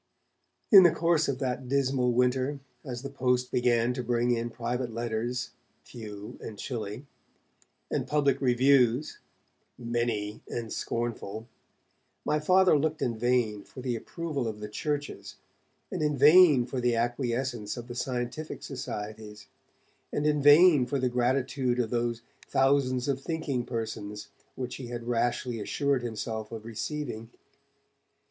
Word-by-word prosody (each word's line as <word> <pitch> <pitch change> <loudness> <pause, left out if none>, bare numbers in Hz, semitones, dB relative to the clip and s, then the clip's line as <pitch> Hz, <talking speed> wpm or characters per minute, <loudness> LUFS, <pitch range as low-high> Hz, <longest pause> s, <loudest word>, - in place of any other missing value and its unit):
In 195 -3 +11
the 175 - +7
course 165 -1 +2
of 140 - -1
that 130 -1 -3
dismal 135 -2 +2
winter, 130 +3 +1 0.2
as 125 -2 -6
the 140 - -4
post 125 -2 0
began 120 -1 +2
to 125 - -3
bring 120 0 +1
in 120 0 0
private 120 +1 -3
letters, 120 +2 -3 0.3
few 105 -3 -9
and 105 - -8
chilly, 110 +1 -5 0.9
and - - -1
public 140 -3 +2
reviews, 130 +1 +3 0.6
many 115 -3 -2
and 115 -2 -4
scornful, 115 -2 -4 0.8
my 150 - +1
Father 185 +3 +5
looked 155 +1 -1
in 120 -2 0
vain 115 -3 +1
for 130 - -11
the 125 -2 -2
approval 145 +1 -4
of 105 -1 -5
the 105 - -5
churches, 145 +6 -4 0.6
and - - -3
in 150 -2 +1
vain 150 -2 +7
for 125 +1 -4
the 120 -1 +2
acquiescence 120 -1 -2
of 120 0 -7
the 120 - -6
scientific 125 +5 -4
societies, 105 -4 -7 0.6
and 145 - -1
in 150 -1 +2
vain 145 -2 +7
for 140 - -1
the 130 -1 +1
gratitude 125 0 0
of 115 -3 0
those 120 -1 -1 0.2
'thousands 135 -2 +2
of 135 -1 -1
thinking 145 -6 -2
persons', 110 -3 -5 0.3
which 125 -1 -5
he 130 - -7
had 120 -1 -5
rashly 120 0 -1
assured 140 +5 0
himself 110 -2 -4
of 110 -1 -7
receiving. 115 0 -5
125 Hz, 140 wpm, -28 LUFS, 115-140 Hz, 0.9 s, In